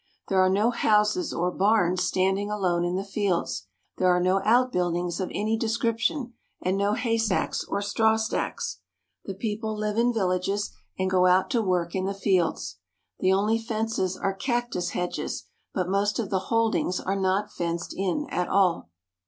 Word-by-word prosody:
There 190 Hz, -, +2 dB
are 185 Hz, -, +4 dB
no 210 Hz, +5 st, +3 dB
houses 220 Hz, +8 st, +2 dB
or 180 Hz, +1 st, 0 dB
barns 185 Hz, -2 st, +2 dB
standing 190 Hz, +2 st, +1 dB
alone 185 Hz, -5 st, 0 dB
in 175 Hz, +1 st, -1 dB
the 190 Hz, -, -1 dB
fields. 180 Hz, -, -1 dB, 0.3 s
There 185 Hz, -, +3 dB
are 180 Hz, 0 st, +4 dB
no 185 Hz, +2 st, +2 dB
outbuildings 180 Hz, -8 st, +1 dB
of 185 Hz, -, -2 dB
any 215 Hz, +2 st, 0 dB
description, 230 Hz, +3 st, -1 dB, 0.3 s
and 185 Hz, +1 st, 0 dB
no 200 Hz, +1 st, +1 dB
haystacks 225 Hz, -3 st, 0 dB
or 200 Hz, -, -2 dB
strawstacks. 220 Hz, +2 st, 0 dB, 0.5 s
The 195 Hz, -, -5 dB
peo 210 Hz, +1 st, -3 dB
ple 220 Hz, -1 st, -3 dB
live 210 Hz, +1 st, -1 dB
in 240 Hz, +1 st, +3 dB
villages 195 Hz, -1 st, 0 dB, 0.3 s
and 190 Hz, -, 0 dB
go 185 Hz, -1 st, +3 dB
out 185 Hz, +1 st, +3 dB
to 240 Hz, -4 st, +2 dB
work 180 Hz, -4 st, 0 dB
in 190 Hz, -1 st, -1 dB
the 195 Hz, +1 st, -2 dB
fields. 165 Hz, -, 0 dB, 0.4 s
Tht 185 Hz, -, +1 dB
only 210 Hz, +4 st, +2 dB
fences 220 Hz, -4 st, -2 dB
are 195 Hz, -, -1 dB
cactus 240 Hz, -5 st, -1 dB
hedges, 180 Hz, 0 st, -3 dB, 0.3 s
but 185 Hz, -2 st, -1 dB
most 200 Hz, +2 st, +1 dB
of 220 Hz, -5 st, -3 dB
the 190 Hz, -, +2 dB
holdings 225 Hz, -5 st, +1 dB
are 195 Hz, -, -2 dB
not 195 Hz, +2 st, 0 dB
fenced 170 Hz, 0 st, -3 dB
in 195 Hz, +11 st, -1 dB
at 180 Hz, -, 0 dB
all. 185 Hz, -, +2 dB
195 Hz, 170 wpm, -26 LUFS, 185-220 Hz, 0.5 s, are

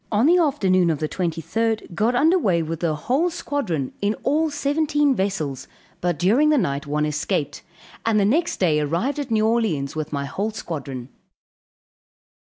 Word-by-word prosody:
On 215 Hz, +3 st, +3 dB
the 350 Hz, +4 st, +5 dB
afternoon 190 Hz, -, +2 dB
of 160 Hz, -, +1 dB
the 155 Hz, -, -2 dB
23d, 185 Hz, +6 st, -2 dB
got 220 Hz, +8 st, +1 dB
underway 265 Hz, -, +3 dB
with 160 Hz, 0 st, -4 dB
the 165 Hz, -3 st, 0 dB
whole 260 Hz, -, 0 dB
squadron, 210 Hz, -, -3 dB
in 205 Hz, +2 st, +1 dB
all 310 Hz, +3 st, +2 dB
seventeen 295 Hz, 0 st, +1 dB
vessels, 190 Hz, -, -2 dB, 0.3 s
but 175 Hz, -3 st, 0 dB
during 225 Hz, -, +3 dB
the 305 Hz, -, +4 dB
night 140 Hz, -, -1 dB
one 150 Hz, +1 st, 0 dB
escaped, 150 Hz, -1 st, -2 dB, 0.4 s
and 225 Hz, -2 st, +2 dB
the 200 Hz, -, +3 dB
next 320 Hz, +11 st, +1 dB
day 160 Hz, -5 st, +3 dB
arrived 170 Hz, -, -1 dB
at 280 Hz, -3 st, -4 dB
New 220 Hz, -1 st, +2 dB
Orleans 210 Hz, -13 st, 0 dB
with 155 Hz, -1 st, -4 dB
my 140 Hz, -1 st, -2 dB
whole 200 Hz, +10 st, -2 dB
squadron. 140 Hz, -, -6 dB
200 Hz, 165 wpm, -22 LUFS, -, 0.4 s, the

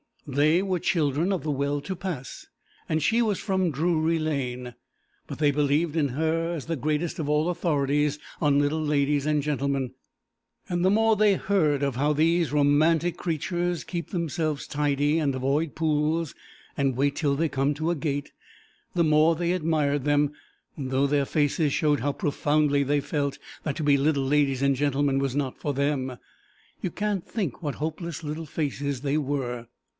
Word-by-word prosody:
They 150 Hz, +6 st, +2 dB
were 185 Hz, -2 st, -1 dB
children 160 Hz, +2 st, +1 dB
of 185 Hz, -, -2 dB
the 155 Hz, -, -1 dB
well 140 Hz, +1 st, -1 dB
to 190 Hz, +6 st, -4 dB
pass, 175 Hz, -8 st, -6 dB, 0.4 s
and 155 Hz, -1 st, 0 dB
she 225 Hz, +8 st, +3 dB
was 215 Hz, -4 st, +1 dB
from 190 Hz, -3 st, 0 dB
Drury 160 Hz, +2 st, +1 dB
Lane, 125 Hz, -6 st, -3 dB, 0.5 s
but -, -, -7 dB
they 145 Hz, -2 st, +4 dB
believed 150 Hz, +3 st, +1 dB
in 150 Hz, -4 st, +2 dB
her 160 Hz, +5 st, 0 dB
as 150 Hz, -, -6 dB
the 165 Hz, -, -2 dB
greatest 155 Hz, +5 st, -1 dB
of 150 Hz, -, -2 dB
all 150 Hz, +3 st, +2 dB
authorities 150 Hz, -4 st, +1 dB, 0.2 s
on 145 Hz, -3 st, +3 dB
little 145 Hz, +2 st, +1 dB
ladies 145 Hz, -1 st, +1 dB
and 150 Hz, -1 st, +1 dB
gentlemen, 140 Hz, -3 st, -1 dB, 0.8 s
and 175 Hz, -1 st, 0 dB
the -, -, +5 dB
more 220 Hz, +2 st, +4 dB
they 210 Hz, -1 st, +4 dB
heard 160 Hz, -8 st, +1 dB
of 140 Hz, -3 st, -1 dB
how 145 Hz, +3 st, +2 dB
these 165 Hz, +1 st, +2 dB
romantic 155 Hz, +4 st, +3 dB
creatures 175 Hz, +1 st, -2 dB
keep 170 Hz, -2 st, -5 dB
themselves 160 Hz, -4 st, -2 dB
tidy 145 Hz, +1 st, +1 dB
and 140 Hz, -4 st, 0 dB
avoid 140 Hz, +4 st, 0 dB
pools 155 Hz, -1 st, 0 dB, 0.4 s
and 135 Hz, -2 st, +1 dB
wait 140 Hz, +2 st, +1 dB
till 145 Hz, -3 st, +1 dB
they 160 Hz, +2 st, 0 dB
come 135 Hz, +1 st, +1 dB
to 155 Hz, +3 st, -1 dB
a -, -, 0 dB
gate, 145 Hz, -2 st, -3 dB, 0.6 s
the 175 Hz, -, +2 dB
more 155 Hz, +1 st, +4 dB
they 170 Hz, +1 st, 0 dB
admired 155 Hz, -5 st, +1 dB
them, 145 Hz, 0 st, +3 dB, 0.5 s
though 135 Hz, 0 st, 0 dB
their 140 Hz, 0 st, +1 dB
faces 145 Hz, 0 st, +1 dB
showed 150 Hz, -2 st, +2 dB
how 145 Hz, +5 st, 0 dB
profoundly 145 Hz, 0 st, +1 dB
they 145 Hz, +1 st, +1 dB
felt 140 Hz, -1 st, -2 dB, 0.3 s
that 150 Hz, -, -2 dB
to 160 Hz, -, -3 dB
be 145 Hz, -1 st, +4 dB
little 140 Hz, 0 st, +1 dB
ladies 140 Hz, -1 st, +2 dB
and 140 Hz, 0 st, +3 dB
gentlemen 140 Hz, 0 st, +1 dB
was 135 Hz, -1 st, -1 dB
not 140 Hz, -3 st, -2 dB
for 145 Hz, -, -2 dB
them. 135 Hz, -2 st, -1 dB, 0.6 s
You 185 Hz, -, -1 dB
can't 205 Hz, 0 st, -2 dB
think 185 Hz, -, -3 dB
what 145 Hz, -4 st, -3 dB
hopeless 160 Hz, +2 st, -4 dB
little 155 Hz, +2 st, -4 dB
faces 140 Hz, -3 st, -2 dB
they 145 Hz, +1 st, 0 dB
were. 130 Hz, -5 st, -2 dB
150 Hz, 175 wpm, -26 LUFS, 140-165 Hz, 0.8 s, the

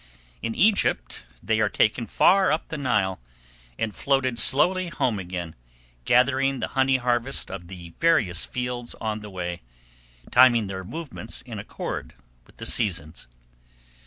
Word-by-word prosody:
In 115 Hz, -, -3 dB
Egypt 205 Hz, -, +1 dB, 0.2 s
they 110 Hz, +3 st, +1 dB
are 105 Hz, -1 st, +2 dB
taken 110 Hz, +2 st, +1 dB
far 190 Hz, -, +4 dB
up 155 Hz, -, -1 dB
the 160 Hz, -, -4 dB
Nile, 100 Hz, -9 st, 0 dB, 0.6 s
and 110 Hz, -2 st, -2 dB
floated 130 Hz, -2 st, 0 dB
slowly 185 Hz, +6 st, +3 dB
home 120 Hz, -10 st, -1 dB
again, 90 Hz, -3 st, -5 dB, 0.5 s
gathering 135 Hz, +2 st, +3 dB
the -, -, -3 dB
honey 135 Hz, 0 st, +2 dB
harvest 120 Hz, +1 st, -1 dB
of 90 Hz, -3 st, -7 dB
the 85 Hz, -2 st, -10 dB
various 120 Hz, -, +3 dB
fields 125 Hz, -1 st, -4 dB
on 110 Hz, -1 st, -2 dB
the 105 Hz, -1 st, -9 dB
way, 90 Hz, -2 st, -5 dB, 0.7 s
timing 120 Hz, -3 st, +6 dB
their 95 Hz, -1 st, -5 dB
movements 130 Hz, -, -6 dB
in 115 Hz, -5 st, -7 dB
accord 100 Hz, -, -6 dB, 0.3 s
with -, -, -23 dB
the -, -, -7 dB
seasons. 85 Hz, -, -1 dB
120 Hz, 140 wpm, -25 LUFS, 95-135 Hz, 0.7 s, timing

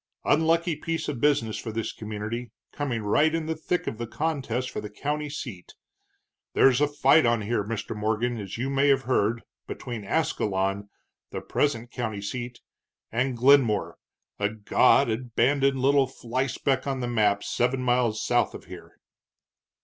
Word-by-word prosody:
Unlucky 165 Hz, +2 st, +2 dB
piece 165 Hz, +1 st, -3 dB
of 135 Hz, -6 st, -4 dB
business 115 Hz, -8 st, +2 dB
for 110 Hz, -, -5 dB
this 115 Hz, 0 st, -3 dB
community, 110 Hz, +3 st, -5 dB, 0.2 s
coming 125 Hz, -7 st, -3 dB
right 150 Hz, +10 st, +3 dB
in 165 Hz, -1 st, -2 dB
the 160 Hz, -, -1 dB
thick 175 Hz, +3 st, -2 dB
of 110 Hz, -, -4 dB
the 120 Hz, -, -3 dB
contest 130 Hz, -2 st, -2 dB
for -, -, -4 dB
the 105 Hz, -, -7 dB
county 150 Hz, +7 st, -3 dB
seat. 120 Hz, -, -8 dB, 0.8 s
There's 135 Hz, 0 st, +4 dB
a 150 Hz, -, +4 dB
fight 145 Hz, -1 st, +4 dB
on 115 Hz, -1 st, +2 dB
here, 105 Hz, 0 st, 0 dB
Mr. 110 Hz, +1 st, -4 dB
Morgan, 110 Hz, +3 st, -1 dB
as 100 Hz, 0 st, -6 dB
you 130 Hz, +3 st, -2 dB
may 140 Hz, +1 st, +2 dB
have 135 Hz, -1 st, +3 dB
heard, 115 Hz, -2 st, +1 dB, 0.2 s
between 120 Hz, -4 st, -6 dB
Ascalon, 100 Hz, -6 st, -1 dB, 0.4 s
the -, -, -5 dB
present 120 Hz, -5 st, -1 dB
county 110 Hz, -4 st, -3 dB
seat, 120 Hz, +3 st, -5 dB, 0.5 s
and 125 Hz, +2 st, 0 dB
Glenmore, 125 Hz, -4 st, +3 dB, 0.4 s
a 105 Hz, 0 st, +1 dB
God 110 Hz, +5 st, +3 dB
abandoned 130 Hz, +4 st, +1 dB
little 135 Hz, +1 st, +3 dB
flyspeck 130 Hz, +2 st, -2 dB
on 135 Hz, -1 st, -1 dB
the 120 Hz, -, -2 dB
map 105 Hz, -4 st, +2 dB
seven 125 Hz, +1 st, 0 dB
miles 120 Hz, -3 st, +1 dB
south -, -, +1 dB
of -, -, -10 dB
here." -, -, -12 dB
125 Hz, 155 wpm, -26 LUFS, 110-140 Hz, 0.8 s, There's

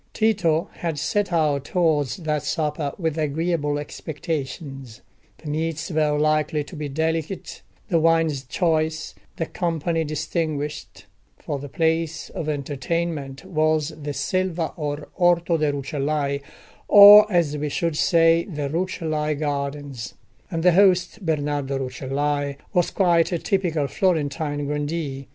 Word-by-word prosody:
Tito 185 Hz, -7 st, +2 dB
had 165 Hz, -3 st, -3 dB
set 205 Hz, +7 st, 0 dB
out 150 Hz, -5 st, +1 dB
towards 155 Hz, -7 st, +1 dB
that 155 Hz, -4 st, -1 dB
supper 150 Hz, -3 st, -2 dB
with 160 Hz, -3 st, -2 dB
agreeable 155 Hz, 0 st, 0 dB
expectations. 140 Hz, -4 st, -6 dB, 0.4 s
The 160 Hz, -, -12 dB
meats 160 Hz, +2 st, -2 dB
were 150 Hz, -2 st, +1 dB
likely 155 Hz, 0 st, +1 dB
to 145 Hz, -, -11 dB
be 150 Hz, -2 st, -4 dB
delicate, 160 Hz, +4 st, -3 dB, 0.3 s
the 170 Hz, -, +3 dB
wines 165 Hz, -3 st, +2 dB
choice, 155 Hz, +1 st, 0 dB, 0.2 s
the 165 Hz, -, -2 dB
company 165 Hz, -1 st, -1 dB
distinguished; 155 Hz, -1 st, -3 dB, 0.3 s
for 145 Hz, -, -4 dB
the 145 Hz, +1 st, -8 dB
place 160 Hz, +1 st, -1 dB
of 155 Hz, -, -4 dB
entertainment 145 Hz, 0 st, -3 dB
was 155 Hz, -2 st, +1 dB
the 150 Hz, -2 st, -6 dB
Selva 185 Hz, -3 st, -1 dB
or 145 Hz, -1 st, -4 dB
Orto 175 Hz, -1 st, +3 dB
de' 150 Hz, -2 st, +1 dB
Rucellai, 140 Hz, 0 st, -2 dB, 0.5 s
or, 210 Hz, +1 st, +10 dB
as 170 Hz, -5 st, +2 dB
we 150 Hz, 0 st, -2 dB
should 165 Hz, +2 st, -1 dB
say, 165 Hz, +1 st, +4 dB
the 150 Hz, -6 st, -4 dB
Rucellai 155 Hz, -2 st, -1 dB
Gardens; 140 Hz, -3 st, -4 dB, 0.3 s
and 165 Hz, -3 st, -3 dB
the 180 Hz, -, +6 dB
host, 185 Hz, +2 st, +3 dB
Bernardo 145 Hz, -4 st, -1 dB
Rucellai, 140 Hz, +2 st, -2 dB, 0.2 s
was 175 Hz, -1 st, +2 dB
quite 175 Hz, -2 st, +2 dB
a 175 Hz, -, +1 dB
typical 165 Hz, -5 st, 0 dB
Florentine 150 Hz, -4 st, -1 dB
grandee. 145 Hz, -1 st, -3 dB
155 Hz, 130 wpm, -23 LUFS, 145-165 Hz, 0.5 s, or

